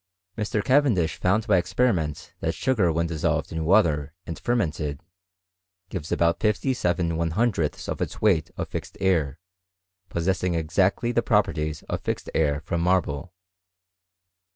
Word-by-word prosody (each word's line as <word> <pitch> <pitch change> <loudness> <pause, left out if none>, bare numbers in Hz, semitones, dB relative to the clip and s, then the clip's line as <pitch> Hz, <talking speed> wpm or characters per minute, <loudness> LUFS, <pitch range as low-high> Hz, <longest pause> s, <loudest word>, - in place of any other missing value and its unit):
Mr. 105 -1 -1
Cavendish 130 - +3
found 105 +4 +1
by 105 -4 +4
experiment 90 - 0
that - - -1
sugar 110 -10 +2
when 85 +1 0
dissolved 80 0 -1
in 80 -1 -3
water 80 -6 +3
and 85 - -6
fermented, 80 - -1 0.9
gives 85 -6 -5
out 85 0 +2
57 105 -6 +1
lOOths 85 +1 0
of - - -4
its - - -3
weight 90 -8 +2
of - - -3
fixed - - -6
air, 80 -7 +1 0.7
possess 90 +2 -1
ing 90 -2 +1
exactly 95 +8 +1
the 120 - +2
properties 80 -9 0
of - - -4
fixed - - -3
air 75 -2 +1
from 85 +2 -2
marble. 85 -2 0
85 Hz, 135 wpm, -25 LUFS, 80-105 Hz, 0.9 s, by